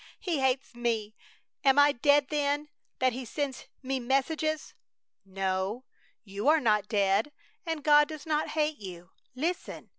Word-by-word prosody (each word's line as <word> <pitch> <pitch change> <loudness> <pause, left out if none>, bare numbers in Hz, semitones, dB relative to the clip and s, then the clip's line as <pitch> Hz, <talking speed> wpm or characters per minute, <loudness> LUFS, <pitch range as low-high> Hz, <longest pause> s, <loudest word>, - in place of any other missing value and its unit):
He 350 -8 -1
hates 265 0 0
me! 230 -3 -2 0.5
Am 270 -1 +4
I 290 0 +7
dead, 285 +2 +3
then, 295 0 0 0.3
that 255 -1 +2
He 255 +2 -5
sends 275 +1 -4 0.2
me 265 0 -1
messages?" 300 +5 -1 0.5
"No, 195 +4 -2 0.4
you 200 +3 -5
are 315 +1 +6
not 210 -5 +2
dead. 200 +5 +1 0.4
And 320 -3 -3
God 295 -1 +6
does 305 -2 -8
not 310 -1 0
hate 305 -1 +1
you. 180 -2 -9 0.2
Listen! 330 +7 -4
265 Hz, 145 wpm, -29 LUFS, 215-295 Hz, 0.5 s, I